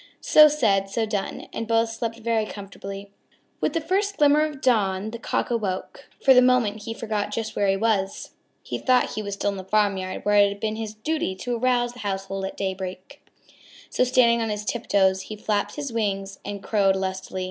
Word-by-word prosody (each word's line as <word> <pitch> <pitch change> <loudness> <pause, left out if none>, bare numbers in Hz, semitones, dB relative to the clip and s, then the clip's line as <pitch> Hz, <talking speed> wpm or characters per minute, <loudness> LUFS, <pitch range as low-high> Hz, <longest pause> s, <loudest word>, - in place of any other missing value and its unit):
So 305 0 +7
said, 205 -10 +1
so 225 +3 0
done, 205 -2 -4
and 225 - -4
both 230 0 +2
slept 230 0 -4
very 225 -1 0
comfortably. 200 0 -8 0.5
With - - 0
the 330 - +1
first 400 +5 0
glimmer 295 +1 +5
of 300 -3 -4
dawn 210 -5 +1
the 235 - -7
Cock 240 - -2
awoke. 210 +3 -3 0.2
For 265 - +8
the 250 - +7
moment 245 -4 +2
he 225 - -3
forgot 210 -2 -3
just 220 0 -4
where 200 - +1
he 195 0 +2
was. 200 -2 -1 0.3
He - - -4
thought 255 -1 +2
he 215 - -3
was 200 -1 -4
still 205 - -1
in 200 - -6
the 190 - -6
farmyard 195 -1 0
where 205 0 +3
it 200 0 +6
had 200 0 -7
been 215 0 -2
his 220 -1 -5
duty 220 -3 -2
to 240 +6 -3
arouse 240 0 +1
the 245 - -13
household 195 -1 -3
at 190 - -6
daybreak. 190 +6 -5 0.7
So - - +2
standing 240 -2 +4
on 225 - -1 0.2
tip 235 +2 -3
toes 190 -1 +3
he 215 - -7
flapped 205 -1 -1
his 280 -5 -5
wings 195 -3 -2
and 200 -1 -6
crowed 195 -3 +2
lustily. 190 0 -4
215 Hz, 200 wpm, -24 LUFS, 195-240 Hz, 0.7 s, For